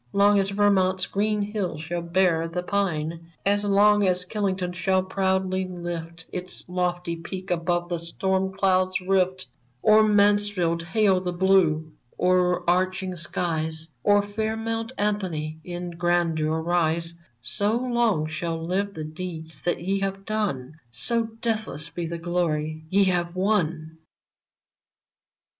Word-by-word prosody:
Long 200 Hz, 0 st, +5 dB
as 195 Hz, 0 st, +1 dB
Vermont's 195 Hz, -2 st, +3 dB
green 210 Hz, +1 st, 0 dB
hills 200 Hz, -7 st, -3 dB
shall 170 Hz, +2 st, -3 dB
bear 170 Hz, -1 st, +2 dB
the 180 Hz, +2 st, -3 dB
pine, 170 Hz, -4 st, -2 dB
As 205 Hz, +1 st, +3 dB
long 205 Hz, +1 st, +4 dB
as 180 Hz, 0 st, +1 dB
Killington 185 Hz, -3 st, -2 dB
shall 185 Hz, +2 st, +1 dB
proudly 190 Hz, 0 st, 0 dB
lift 170 Hz, -2 st, -6 dB
Its 180 Hz, 0 st, -5 dB
lofty 180 Hz, -1 st, -1 dB
peak 185 Hz, +3 st, -7 dB
above 175 Hz, 0 st, 0 dB
the 175 Hz, -2 st, -1 dB
storm 190 Hz, +3 st, -1 dB
cloud's 185 Hz, -1 st, +2 dB
rift, 185 Hz, 0 st, +1 dB, 0.4 s
Or 215 Hz, 0 st, +7 dB
Mansfield 205 Hz, -5 st, +3 dB
hail 190 Hz, +1 st, +2 dB
the 180 Hz, -1 st, -2 dB
blue, 175 Hz, -4 st, +3 dB, 0.3 s
o'erarching 185 Hz, +1 st, +2 dB
skies, 160 Hz, -1 st, -3 dB
Or 205 Hz, 0 st, +4 dB
fair 220 Hz, +2 st, -2 dB
Mount 225 Hz, +1 st, -3 dB
Anthony 180 Hz, -7 st, -2 dB
in 175 Hz, 0 st, -5 dB
grandeur 165 Hz, -2 st, +1 dB
rise, 170 Hz, -1 st, +1 dB, 0.3 s
So 200 Hz, -, 0 dB
long 235 Hz, -9 st, +1 dB
shall 165 Hz, +1 st, -3 dB
live 190 Hz, +5 st, -2 dB
the 155 Hz, -, -4 dB
deeds 160 Hz, -2 st, -7 dB
that 175 Hz, -, 0 dB
ye 195 Hz, +2 st, 0 dB
have 195 Hz, 0 st, -3 dB
done. 160 Hz, -, -2 dB
So 230 Hz, -, 0 dB, 0.2 s
deathless 215 Hz, -9 st, -2 dB
be 170 Hz, -1 st, -4 dB
the 170 Hz, +1 st, -4 dB
glory 160 Hz, -2 st, -1 dB
ye 200 Hz, +3 st, +4 dB
have 175 Hz, -2 st, 0 dB
won 170 Hz, -5 st, 0 dB
180 Hz, 130 wpm, -25 LUFS, 165-200 Hz, 0.4 s, Or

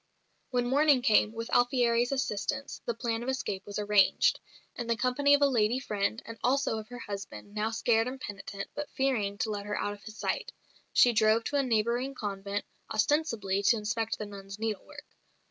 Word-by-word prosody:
When 245 Hz, -2 st, 0 dB
morning 275 Hz, 0 st, +4 dB
came, 215 Hz, -1 st, +4 dB
with 230 Hz, 0 st, -6 dB
Alfieri's 245 Hz, -1 st, +3 dB
assistance, 265 Hz, -1 st, -2 dB
the 235 Hz, -, 0 dB
plan 230 Hz, 0 st, -2 dB
of 245 Hz, -, -3 dB
escape 235 Hz, -8 st, -3 dB
was 205 Hz, -, -5 dB
arranged. 210 Hz, -1 st, +3 dB, 0.4 s
In 240 Hz, -, -4 dB
the 235 Hz, -, +2 dB
company 280 Hz, +5 st, +4 dB
of 285 Hz, -, +2 dB
a -, -, +6 dB
lady 235 Hz, -2 st, +2 dB
friend 215 Hz, -3 st, -2 dB
and 230 Hz, 0 st, -9 dB
also 255 Hz, -3 st, +1 dB
of 215 Hz, -, -9 dB
her 245 Hz, +1 st, -9 dB
husband, 200 Hz, -, -7 dB
now 215 Hz, +1 st, 0 dB
scared 225 Hz, 0 st, +2 dB
and 260 Hz, +1 st, -5 dB
penitent, 200 Hz, -3 st, -6 dB
but 295 Hz, 0 st, -5 dB
fearing 225 Hz, -7 st, 0 dB
to 220 Hz, 0 st, -1 dB
let 205 Hz, -1 st, -4 dB
her 205 Hz, -, -2 dB
out 205 Hz, -, -1 dB
of 205 Hz, -, -13 dB
his 220 Hz, 0 st, -10 dB
sight -, -, -2 dB, 0.4 s
she 245 Hz, -, +5 dB
drove 220 Hz, +1 st, +4 dB
to 290 Hz, -, -3 dB
a -, -, +4 dB
neighbouring 240 Hz, +2 st, 0 dB
convent, 200 Hz, -2 st, -4 dB, 0.3 s
ostensibly 215 Hz, -5 st, +1 dB
to 225 Hz, +4 st, +4 dB
inspect 225 Hz, +1 st, -2 dB
the 210 Hz, -, -4 dB
nuns' 200 Hz, -1 st, -9 dB
needlework. 225 Hz, +8 st, -5 dB
225 Hz, 190 wpm, -30 LUFS, 205-250 Hz, 0.4 s, a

